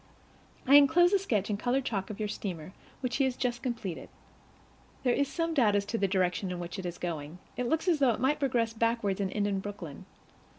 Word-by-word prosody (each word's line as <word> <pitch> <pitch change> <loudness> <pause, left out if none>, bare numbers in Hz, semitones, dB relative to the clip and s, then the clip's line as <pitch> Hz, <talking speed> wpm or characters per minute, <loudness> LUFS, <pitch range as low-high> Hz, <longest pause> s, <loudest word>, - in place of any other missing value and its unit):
I 280 +2 +8
inclose 350 +6 +5
a 400 - +5
sketch 215 - -1
in 205 - 0
colored 255 +4 0
chalk 195 -6 -2
of 210 - -6
your 215 - -2
steamer, 185 -4 -5 0.3
which 250 -2 -1
he 275 - +3
has 260 -2 -1
just 245 0 -1
completed. 230 -9 -4 0.9
There 250 -2 +3
is 280 +2 +1
some 330 +3 -2
doubt 230 -9 +3
as 200 0 +1
to 230 - -2
the 195 - +2
direction 185 -1 0
in 180 - -3
which 175 +1 -6
it 185 - -4
is 175 0 -6
going; 160 -2 -5 0.2
it 250 -1 -2
looks 320 +3 0
as 335 -4 +3
though 270 -3 +4
it 230 - 0
might 280 +4 +1
progress 235 -5 +1
backward 230 -4 0
and 190 -1 -1
end 205 0 0
in 200 -1 0
Brooklyn. 190 -7 -8
220 Hz, 225 wpm, -30 LUFS, 190-265 Hz, 0.9 s, I